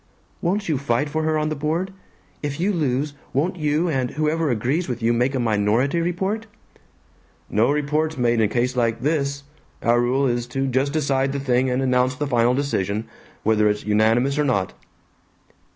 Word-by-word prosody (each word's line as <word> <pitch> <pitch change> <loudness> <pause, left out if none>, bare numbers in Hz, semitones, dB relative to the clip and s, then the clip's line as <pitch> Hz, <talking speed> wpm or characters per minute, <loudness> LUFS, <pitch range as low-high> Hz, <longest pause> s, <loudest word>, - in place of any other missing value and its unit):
"Won't 195 +4 0
you 155 -5 0
fight 140 +1 0
for 155 +2 -1
her 155 0 +1
on 155 0 0
the 155 - -2
board? 160 +6 -2 0.5
If 145 0 -4
you 200 +4 +1
lose, 145 -3 0 0.2
won't 165 +7 0
you, 155 +2 +1
and 130 -6 0
whoever 155 +2 0
agrees 130 +9 0
with 120 -2 -4
you, 115 +1 +3
make 125 +3 +1
a - - 0
minority 115 +7 +1
report?" 190 +6 -2 1.0
"No 110 +4 +3
reports 150 +2 0
made 120 -2 +2
in - - +4
a 110 - +4
case 125 +4 0
like 115 -2 0
this. 140 -1 -1 0.4
Our 120 +1 +3
rule 130 +3 +1
is 120 -1 0
to 135 +2 -2
just 135 +2 0
decide 140 -3 0
the 140 - -2
thing 130 -1 +1
and 125 +1 0
announce 130 0 +2
the 145 - -2
final 120 -2 +2
decision, 110 -6 -1 0.4
whether 105 -1 +3
it's 105 0 -2
unanimous 115 +7 +2
or - - +3
not." 100 -10 0
135 Hz, 185 wpm, -22 LUFS, 120-150 Hz, 1.0 s, in